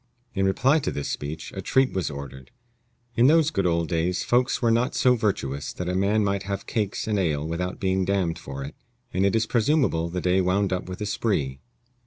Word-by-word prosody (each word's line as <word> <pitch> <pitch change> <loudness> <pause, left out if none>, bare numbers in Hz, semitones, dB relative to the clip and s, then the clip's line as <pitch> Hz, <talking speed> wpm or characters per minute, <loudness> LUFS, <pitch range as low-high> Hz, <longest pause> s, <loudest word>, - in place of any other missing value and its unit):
In 95 0 +1
reply 135 +10 +3
to - - -2
this 70 - -4
speech 75 +2 -5
a 95 - -4
treat 130 +7 +2
was 95 -3 -1
ordered. 70 -2 -8 0.7
In 120 +2 +5
those 160 +1 +4
good 95 - +1
old 85 -1 +1
days 85 +2 0
folks 125 +1 +2
were 115 -3 +2
not 120 +2 +1
so 125 - +4
virtuous 75 - -2
but 90 - -4
that 90 - -1
a - - -2
man 100 +3 +2
might 100 -1 0
have 100 0 -4
cakes 105 -1 -2
and 105 -2 +1
ale 75 -4 0
without 90 +2 -3
being 95 0 +1
damned 90 -4 0
for 70 -3 -7
it, 70 - -7 0.4
and 95 +2 +2
it 100 - +1
is 110 0 +2
presumable 115 - +1
the 90 +2 -3
day 90 +1 +2
wound 95 +1 +1
up 90 0 -3
with 90 +3 -7
a - - -1
spree. 75 - -1
95 Hz, 220 wpm, -25 LUFS, 85-110 Hz, 0.7 s, In